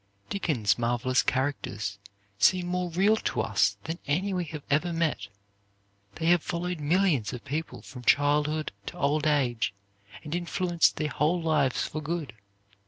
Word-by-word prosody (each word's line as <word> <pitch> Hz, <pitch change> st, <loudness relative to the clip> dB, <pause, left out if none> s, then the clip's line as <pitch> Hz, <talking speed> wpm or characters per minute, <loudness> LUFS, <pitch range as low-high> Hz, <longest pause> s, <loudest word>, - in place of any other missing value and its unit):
Dickens' 135 Hz, -, +1 dB
marvelous 120 Hz, +2 st, +2 dB
characters 110 Hz, -7 st, -2 dB, 0.4 s
seem 185 Hz, -, +4 dB
more 180 Hz, 0 st, -1 dB
real 195 Hz, +6 st, +3 dB
to -, -, -1 dB
us -, -, +2 dB
than 165 Hz, +2 st, -4 dB
any 185 Hz, +7 st, 0 dB
we 180 Hz, -1 st, -1 dB
have 150 Hz, -2 st, -7 dB
ever 155 Hz, +5 st, +1 dB
met. 165 Hz, -11 st, -1 dB, 0.9 s
They 160 Hz, -, -4 dB
have 175 Hz, 0 st, +5 dB
followed 175 Hz, 0 st, -3 dB
millions 150 Hz, -, +2 dB
of 125 Hz, -, -8 dB
people 150 Hz, +4 st, -4 dB
from 125 Hz, -2 st, -10 dB
childhood 150 Hz, +4 st, +2 dB, 0.2 s
to -, -, -6 dB
old 150 Hz, +2 st, +1 dB
age, 125 Hz, -8 st, +1 dB, 0.5 s
and 150 Hz, -, -6 dB
influenced 175 Hz, 0 st, +1 dB
their 155 Hz, -1 st, -1 dB
whole 155 Hz, +7 st, +1 dB
lives 155 Hz, -5 st, +1 dB
for 155 Hz, -, -4 dB
good. 155 Hz, -5 st, -3 dB
155 Hz, 150 wpm, -28 LUFS, 135-175 Hz, 0.9 s, have